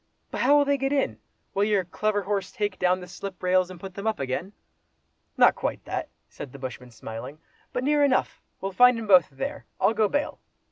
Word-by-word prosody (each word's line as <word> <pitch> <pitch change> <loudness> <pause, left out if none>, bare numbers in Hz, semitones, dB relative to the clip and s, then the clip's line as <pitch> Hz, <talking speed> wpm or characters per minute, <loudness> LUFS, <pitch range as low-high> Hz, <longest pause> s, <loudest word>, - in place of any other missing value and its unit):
"But - - -3
how 290 - +6
will 290 - +4
they 280 0 +1
get 270 +1 0
in? 280 -2 0 0.3
Will 200 - +2
your 205 -3 +2
clever 205 +3 -1
horse 195 -2 -2
take 205 -5 -2
down 180 0 +3
the 180 - -9
slip 185 +1 -8
rails, 185 0 +3
and 185 -2 -10
put 190 0 -8
them 200 +3 -5
up 220 - 0
again?" 135 +8 -3 0.9
"Not - - +7
quite - - -4
that!" - - -3 0.2
said 135 - -9
the 140 - -10
bushman 125 -2 -7
smiling—"but 125 - -8
near 295 +1 +3
enough; 270 -2 +1 0.2
we'll 195 - -2
find 250 +4 +6
'em 225 - -4
both 185 -5 +6
there, 135 -1 -5
I'll - - +3
go 215 -1 +3
bail!" 290 +6 -2
195 Hz, 205 wpm, -26 LUFS, 180-240 Hz, 0.9 s, Not